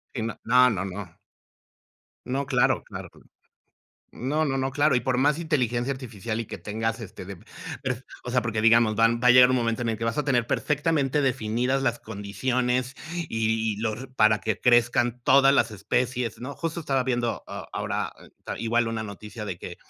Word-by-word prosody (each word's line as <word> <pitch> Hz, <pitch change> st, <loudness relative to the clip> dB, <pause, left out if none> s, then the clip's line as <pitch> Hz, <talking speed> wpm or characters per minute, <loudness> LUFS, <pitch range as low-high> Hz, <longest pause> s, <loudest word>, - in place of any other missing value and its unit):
Sí, 115 Hz, -, -2 dB, 0.2 s
no, 125 Hz, +2 st, +5 dB
no, 95 Hz, -5 st, -2 dB
no. 95 Hz, -2 st, -7 dB, 1.1 s
No, 135 Hz, +3 st, -2 dB
claro, 130 Hz, -2 st, +2 dB
claro, -, -, -8 dB, 1.0 s
no, 150 Hz, +6 st, -1 dB
no, 135 Hz, -3 st, -1 dB
no, 130 Hz, 0 st, -1 dB
claro, 145 Hz, -1 st, +3 dB
y -, -, +2 dB
por 125 Hz, +1 st, 0 dB
más 145 Hz, +3 st, +3 dB
inteligencia 130 Hz, -6 st, 0 dB
artificial, 115 Hz, -4 st, -5 dB
y 115 Hz, -, -5 dB
que -, -, -7 dB
tengas, 110 Hz, +2 st, -3 dB
este 100 Hz, -4 st, -9 dB
de 95 Hz, -1 st, -9 dB, 0.9 s
o 125 Hz, -, -4 dB
sea, 125 Hz, 0 st, +2 dB
porque 110 Hz, -2 st, -1 dB
digamos 115 Hz, -1 st, +5 dB
van 115 Hz, +1 st, +3 dB
va 125 Hz, -, +5 dB
a -, -, +9 dB
llegar 125 Hz, 0 st, +8 dB
un 130 Hz, -, +3 dB
momento 115 Hz, -1 st, 0 dB
en 120 Hz, -, -1 dB
el 110 Hz, -, -3 dB
que 115 Hz, -, -3 dB
vas 115 Hz, +5 st, -1 dB
a 150 Hz, -, +1 dB
tener 125 Hz, -5 st, +1 dB
perfectamente 150 Hz, 0 st, +1 dB
definidas 130 Hz, +1 st, 0 dB
las 120 Hz, -2 st, 0 dB
condiciones, 125 Hz, +5 st, -2 dB, 0.2 s
y 110 Hz, -9 st, -1 dB
y -, -, -11 dB
los 110 Hz, +4 st, -3 dB
para 110 Hz, -2 st, +4 dB
que 110 Hz, -3 st, -2 dB
crezcan 120 Hz, 0 st, +3 dB
todas 135 Hz, +2 st, +5 dB
las 120 Hz, -4 st, +3 dB
especies, 120 Hz, +2 st, -2 dB
¿no?, 135 Hz, +4 st, -6 dB
justo 165 Hz, +2 st, -4 dB
estaba 135 Hz, -4 st, 0 dB
viendo 120 Hz, -2 st, -1 dB
a -, -, -8 dB
ahora -, -, -2 dB, 0.5 s
igual 115 Hz, 0 st, +1 dB
una 115 Hz, -1 st, -3 dB
noticia 105 Hz, +1 st, -8 dB
de 95 Hz, -4 st, -5 dB
que -, -, -8 dB
120 Hz, 185 wpm, -26 LUFS, 110-130 Hz, 1.1 s, a